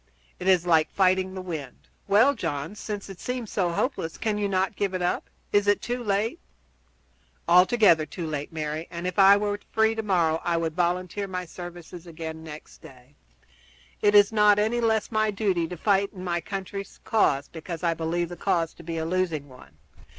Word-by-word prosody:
It 180 - -4
is 185 -2 +4
like 160 -3 +3
fighting 190 0 +1
the 185 - -5
wind." 155 -8 -7 0.2
"Well, 230 +8 +5
John, 165 - -4
since 210 -1 -6
it 195 -3 -10
seems 250 -3 -4
so 185 -4 0
hopeless, 170 - -2
cannot 200 -3 0
you - - -28
give 195 -2 -1
it 185 - -2
up? 175 - -1 0.2
Is 205 0 +3
it 205 - +4
too 245 0 -4
late?" 210 +1 0 1.1
"Altogether 180 -2 +5
too 175 - -6
late, 150 0 -4
Mary, 155 0 -4
and 170 0 -6
if 180 +2 -2
I 195 +1 +8
were 205 0 -1
free 220 0 +3
tomorrow 180 -7 +1
I 170 -1 0
would 165 -1 -1
volunteer 180 +3 -1
my 180 -1 -4
services 175 0 -10
again 160 -1 -7
next 155 -1 -11
day. 130 +1 -16 0.9
It 205 0 +4
is 205 +1 +7
not 210 -1 +5
any 220 +3 +1
the 230 - +2
less 220 0 0
my 215 -1 +2
duty 190 -5 0
to 180 - -7
fight 200 +2 +2
in 185 -2 -9
my 175 -1 -1
country's 195 +2 -6
cause 145 -10 +2
because 165 +1 -7
I 170 -1 +2
believe 165 +1 -2
the 175 - -7
cause 170 -2 0
to - - -14
be 165 0 -4
a 160 - -2
losing 165 -5 -1
one. 125 - -16
180 Hz, 190 wpm, -26 LUFS, 165-205 Hz, 1.1 s, I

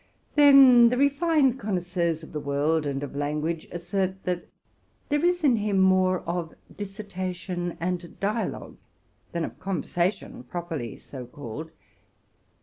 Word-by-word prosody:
Then, 270 -5 +8
the 250 - 0
refined 280 -1 +3
connoisseurs 175 -5 -1
of - - -11
the 150 - -2
world 145 +2 0
and 140 0 -2
of 140 - -6
language 150 +3 -2
assert 190 +2 -2
that 180 -1 -3 0.6
there 295 +1 +1
is 355 -1 +2
in 255 -6 +4
him 205 -2 0
more 185 -1 +4
of 170 -1 -4 0.2
dissertation 185 -3 -5
and 175 0 -4
dialogue 215 +3 -3 0.5
than 170 -1 -1
of - - -9
conversation, 180 -1 -2
properly 155 - -5
so 130 -3 -9
called. 145 +4 -8
180 Hz, 130 wpm, -26 LUFS, 160-210 Hz, 0.6 s, Then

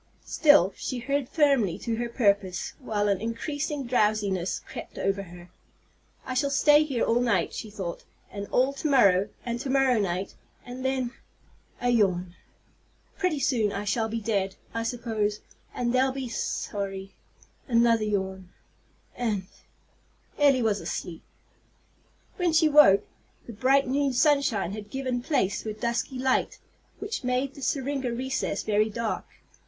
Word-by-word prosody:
Still, 290 - +5
she 255 - -4
held 275 +2 -2
firmly 275 - +2
to 230 -2 -3
her 240 0 -2
purpose, 200 -6 0
while 210 -5 -1
an 200 -1 +1
increasing 285 +5 -3
drowsiness 210 -6 +1
crept - - -9
over 195 0 0
her. 175 -1 -12 0.7
"I 255 - -4
shall 280 +2 +1
stay 295 +2 +5
here 275 -6 -1
all 235 +1 +2
night," 205 -9 +1
she 220 - -6
thought, 190 -4 -6 0.3
"and 200 0 -6
all 260 +2 +2
to 290 +2 -3
morrow, 200 -7 +4 0.2
and 235 0 -2
to 265 - -4
morrow 265 -3 +3
night. 190 -1 -2 0.3
And 250 +1 -7
then" 260 -2 -1 0.7
a 245 - 0
yawn 185 -6 +1 0.8
"pretty 365 -6 0
soon 235 -6 +1
I 200 0 -3
shall 220 +2 0
be 230 +1 -2
dead, 200 -3 -1 0.2
I 230 - -2
suppose, 225 -3 -2 0.3
and 240 -1 -1
they'll 260 +1 +3
be 260 -2 -5
sorry" 195 -3 -4 0.5
another 230 -2 +3
yawn 190 -3 -2 0.7
"and 215 -6 -1 0.5
" - - -29
Elly 275 -4 +4
was 210 -2 +1
asleep. 165 -2 -5 1.2
When 355 -3 +1
she 315 0 +5
woke, 285 -10 +6 0.4
the 235 - -8
bright 265 +5 +3
noon 275 +1 +1
sunshine 265 - +2
had 210 0 -7
given 255 0 -2
place 245 -8 0
to 220 - -5
a - - -3
dusky 235 +3 -2
light, 260 0 0 0.4
which - - -5
made 255 +2 0
the 280 - -12
syringa 270 -2 -1
recess 260 +3 -2
very 215 0 +2
dark. 230 +1 -3
235 Hz, 150 wpm, -27 LUFS, 205-265 Hz, 1.2 s, woke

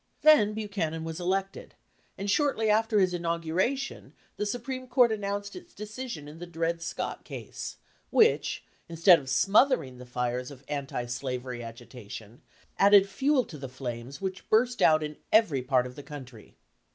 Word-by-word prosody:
Then 280 -10 +6
Buchanan 195 -7 -3
was 165 +1 -5
elected, 190 +2 -2 0.4
and 200 - -4
shortly 225 -2 +2
after 220 0 +3
his 185 -2 +3
in 175 -1 -3
auguration 170 +11 -1 0.2
the 210 - -2
Supreme 255 +4 -4
Court 245 -1 +4
announced 200 -1 -3
its 355 -1 -12
decision 215 - -6
in 155 +2 -11
the 175 - -7
Dred 165 0 -2
Scott 170 - -4
case, - - -7 0.3
which, 455 0 +3 0.3
instead 170 +1 +6
of 135 -2 -9
smothering 195 - +3
the 125 - -10
fires 125 0 -2
of 140 -2 -12
anti 140 -4 -3
slavery 125 0 -4
agitation, 115 -1 -10 0.4
added 200 0 +7
fuel 270 +5 +1
to 150 - -10
the 135 -1 -6
flames 125 +1 -6
which 190 -1 -5
burst 240 +3 +3
out 155 -1 +5
in 150 0 -5
every 210 - +4
part 125 -1 +2
of 125 - -7
the - - -8
country. 130 -6 -11
170 Hz, 160 wpm, -28 LUFS, 130-215 Hz, 0.4 s, added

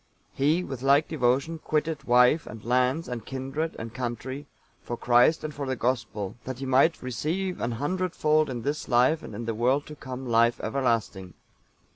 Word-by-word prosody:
He, 155 +6 +2
with 135 -7 -6
like 140 +3 +4
devotion, 140 +3 +1
quitted 155 0 -2
wife, 125 +5 +4
and 105 0 -10
lands, 125 +6 +1
and 120 -3 -5
kindred 135 +6 -4
and 115 0 -7
country, 130 +3 -5 0.3
for 120 - -5
Christ 125 +7 +4
and 155 -1 -4
for 140 -1 -5
the 130 - -1
Gospel, 115 -5 -2
that 130 -1 -5
he 135 - -5
might 135 +5 +3
"receive 165 +9 -2
an 120 - -1
hundred 180 +9 -2
fold 155 -1 +2
in 120 -3 -4
this 145 +3 -2
life, 130 +6 +3
and 110 - -9
in 115 +2 -5
the 115 - -1
world 125 +6 +1
to 150 - -9
come 130 -2 -7
life 115 0 +3
everlasting." 115 - -1
130 Hz, 180 wpm, -27 LUFS, 120-150 Hz, 0.3 s, like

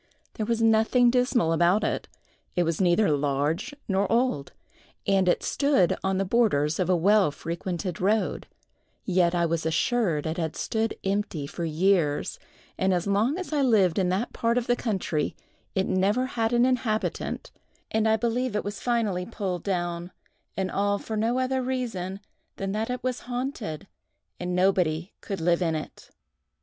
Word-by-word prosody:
There 215 -2 -3
was 230 -1 +1
nothing 225 +2 +4
dismal 245 -9 +2
about 175 +5 +3
it: - - -1 0.5
it 175 - +3
was 165 +1 -1
neither 180 +1 +3
large 145 - -1 0.2
nor 195 0 +1
old, 230 - +1 0.5
and 190 -2 +3
it - - +1
stood 280 -11 +2
on 190 0 +1
the 195 - 0
borders 180 -9 +2
of 185 -1 0
a 185 - +4
well 195 +1 +4
frequented 170 +3 -4
road; 210 +3 0 0.6
yet 180 -2 +2
I 170 -1 +2
was 165 -1 -1
assured 165 0 +1
it 160 +2 -2
had 160 -2 -2
stood 225 0 -1
empty 195 -6 -1
for 170 +4 -5
years; 160 -2 +1 0.4
and 190 0 +2
as 175 - -1
long 210 - +1
as 365 -4 -5
I 295 - +2
lived 205 -9 +3
in 185 -2 +1
that 195 +6 -1
part 235 +1 +1
of 245 - 0
the 245 - +2
country 190 - -2 0.4
it 190 -1 +2
never 200 +7 +2
had 230 -3 -1
an 240 0 +4
inhabitant, 240 -4 -1 0.4
and 220 0 +2
I 220 - +4
believe 235 +1 -1
was 205 +1 -5
finally 215 -7 0
pulled 190 -6 -3
down—and 175 +1 -4
all 205 +1 +1
for 220 - -5
no 225 +3 +1
other 260 0 0
reason 225 -7 -3 0.3
than 195 0 -3
that 215 +3 -2
it 250 0 -3
was 255 -1 -1
haunted, 245 - -4 0.5
and 180 0 -2
nobody 180 -2 +1
could 195 -2 -4
live 170 +2 +2
in 165 -2 +1
it. 155 - -7
195 Hz, 165 wpm, -26 LUFS, 175-230 Hz, 0.6 s, nothing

